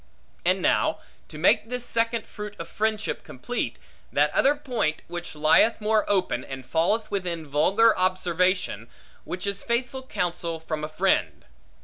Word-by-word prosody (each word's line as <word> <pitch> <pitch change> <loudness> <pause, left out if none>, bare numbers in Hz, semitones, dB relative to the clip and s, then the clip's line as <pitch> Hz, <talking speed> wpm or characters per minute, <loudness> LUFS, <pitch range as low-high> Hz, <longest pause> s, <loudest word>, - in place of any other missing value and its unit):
Add - - +4
now, - - +2 0.3
to 150 - -10
make 180 +7 +3
this 250 -1 -3
second 230 -1 0
fruit 210 0 -8
of 165 - -6
friendship 215 +3 -1
complete, - - -4 0.3
that - - +3
other 285 +2 +4
point, 245 - -2
which 175 -1 -6
lieth 155 +9 +4
more 215 0 +1
open, 185 -11 +1
and 135 -1 -8
falleth 190 - 0
within 175 -5 -2
vulgar 190 +11 +4
observation; 185 - 0 0.4
which 180 +2 -5
is 200 0 -1
faithful 245 +2 -1
counsel 175 -8 -3
from 155 -1 -4
a - - -1
friend. 155 - 0
185 Hz, 145 wpm, -26 LUFS, 165-220 Hz, 0.4 s, Add